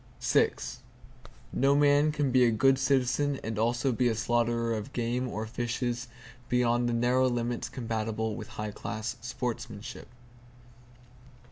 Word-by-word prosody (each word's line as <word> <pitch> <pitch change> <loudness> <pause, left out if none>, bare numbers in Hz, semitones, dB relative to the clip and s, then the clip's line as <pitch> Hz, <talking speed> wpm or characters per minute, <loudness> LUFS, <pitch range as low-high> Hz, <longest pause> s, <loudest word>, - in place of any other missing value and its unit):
No 140 +2 +3
man 145 +1 +4
can 145 -3 0
be 125 0 +5
a 120 - +5
good 135 +4 +3
citizen 135 +1 +1
and 110 -1 -3
also 120 +4 +1
be 125 +1 +1
a 115 - +1
slaughterer 120 0 +1
of 110 -1 -5
game 120 +1 -1
or 110 -2 -4
fishes 120 +1 -2 0.4
beyond 120 0 +2
the - - 0
narrow 125 +2 +3
limits 120 0 -2
compatible 110 -2 -2
with 110 -2 -7
high 105 0 -3
class 110 +4 -5
sportsmanship. 120 -1 -5
120 Hz, 130 wpm, -29 LUFS, 115-130 Hz, 0.4 s, be